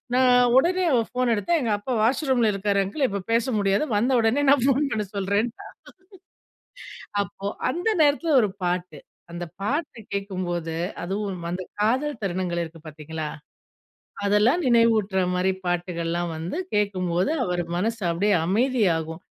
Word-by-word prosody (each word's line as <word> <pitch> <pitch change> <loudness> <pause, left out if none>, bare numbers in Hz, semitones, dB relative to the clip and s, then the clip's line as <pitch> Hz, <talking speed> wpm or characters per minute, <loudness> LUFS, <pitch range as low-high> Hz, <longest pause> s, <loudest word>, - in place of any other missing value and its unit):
நான் 250 -1 +5
உடனே 360 +5 +3
அவ 235 - +4
ஃபோன 250 -1 +1
எடுத்தா 340 +12 0
எங்க 230 -3 -1
அப்பா 250 +5 -4
வாஷ் 250 +7 +2
ரூம்ல 235 -5 +3
இருக்காரு 200 0 +1
அங்கிள் 265 +7 0
இப்ப 200 -1 -4
பேச 230 0 +2
முடியாது 200 +8 +2
வந்த 245 +5 +1
உடனே 235 +6 +2
நான் 275 -3 +5
ஃபோன் 280 +1 +2
பண்ண 215 -1 -1
சொல்றேன்ட்டா 200 +4 -1 1.6
அப்போ 195 +1 -8 0.2
அந்த 355 +6 -2
நேரத்துல 295 +2 +2
ஒரு 210 -3 +1
பாட்டு. 175 -4 -2 0.3
அந்த 175 0 -5 0.2
பாட்டு 285 +4 -2
கேக்கும்போது 180 -5 -3 0.3
அதுவும் 190 -1 -4
அந்த 185 +1 -3 0.2
காதல் 255 +3 0
தருணங்கள் 175 -2 -1
இருக்கு 165 0 -12
பாத்தீங்களா? 155 0 -6 1.0
அதெல்லாம் 215 - +3
நினைவூட்டுற 225 -5 +3
மாரி 185 +1 +1
பாட்டுகள்லாம் 175 -1 -2
வந்து 170 - -4 0.2
கேட்கும்போது 185 - 0
அவர் 180 -1 -1 0.2
மனசு 225 +3 -1
அப்டியே 200 +5 +1
அமைதியாகும். 190 -7 +1
200 Hz, 135 wpm, -24 LUFS, 180-245 Hz, 1.6 s, நான்